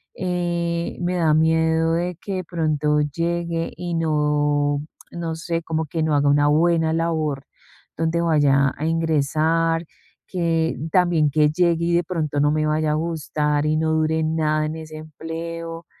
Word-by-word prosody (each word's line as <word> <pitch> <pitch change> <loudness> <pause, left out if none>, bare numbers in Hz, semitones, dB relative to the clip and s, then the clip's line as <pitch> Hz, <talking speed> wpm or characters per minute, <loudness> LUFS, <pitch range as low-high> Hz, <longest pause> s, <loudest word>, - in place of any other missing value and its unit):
eh, 175 -2 -2
me 175 +1 -1
da 165 -3 +2
miedo 160 +1 +2
de 175 +2 -1
que 195 - -4
de 185 - -3
pronto 155 -3 0
llegue 170 +2 -2
y 175 -1 -4
no 150 -2 +1 0.3
no 165 -1 -4
sé, 165 0 -3
como 160 0 -2
que 160 +2 -3
no 155 -1 +1
haga 145 0 +2
una 145 +1 +4
buena 160 +1 +3
labor 160 -4 -1 0.5
donde 165 +1 0
vaya 140 -4 +3
a 150 - -3
ingresar, 165 +1 +1 0.4
que 165 -3 0 0.2
también 175 -5 +3
que 150 +1 +3
llegue 170 +1 +1
y 170 - +1
de 175 0 +2
pronto 155 -4 -2
no 145 +1 +3
me 155 0 0
vaya 155 0 +1
a - - +1
gustar 150 -2 -1
y 155 0 +1
no 160 0 +1
dure 160 0 +1
nada 155 -1 0
en 155 +1 -4
ese 155 -1 -9
empleo. 165 +2 -7
160 Hz, 160 wpm, -22 LUFS, 150-170 Hz, 0.5 s, una